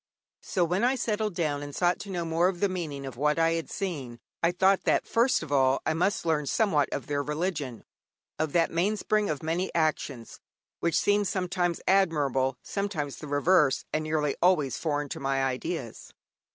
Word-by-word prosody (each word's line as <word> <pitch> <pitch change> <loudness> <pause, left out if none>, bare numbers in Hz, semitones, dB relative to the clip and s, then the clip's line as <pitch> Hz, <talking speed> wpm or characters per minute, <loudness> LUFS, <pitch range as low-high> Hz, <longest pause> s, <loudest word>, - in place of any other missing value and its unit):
So 180 -2 0
when 180 +5 0
I 255 +2 +3
settled 215 -5 -1
down 150 -4 -1
and 145 -1 -7
sought 175 0 +2
to 200 - -8
know 175 -3 -2
more 165 +2 +2
of 185 -2 -2
the 200 - +3
meaning 160 -7 -4
of 130 -3 -7
what 150 +3 +1
I 165 0 +3
had 165 -1 -2
seen, 140 -11 -4 0.2
I 170 - +3
thought 190 +2 +3
that - - +2
first 235 -4 +2
of 150 - -9
all 135 -1 +3
I 160 - +1
must 180 +4 0
learn 155 -3 +1
somewhat 155 -6 +2
of 140 - -3
their 145 -1 -1
religion, 150 -4 -3 0.6
of 155 -1 0
that 170 -1 +3
mainspring 210 +4 +1
of 150 0 -3
many 170 +4 -1
actions, 155 -7 -1 0.4
which 170 -1 +1
seemed 205 0 +2
sometimes 180 -2 -1
admirable, 145 -9 +2
sometimes 160 - -3
the 150 - -8
reverse, 145 0 +3
and 155 - 0
nearly 155 -2 0
always 165 -7 +3
foreign 150 -2 -1
to 160 - -5
my 135 -1 0
ideas. 130 -2 -4
165 Hz, 185 wpm, -28 LUFS, 145-185 Hz, 0.6 s, I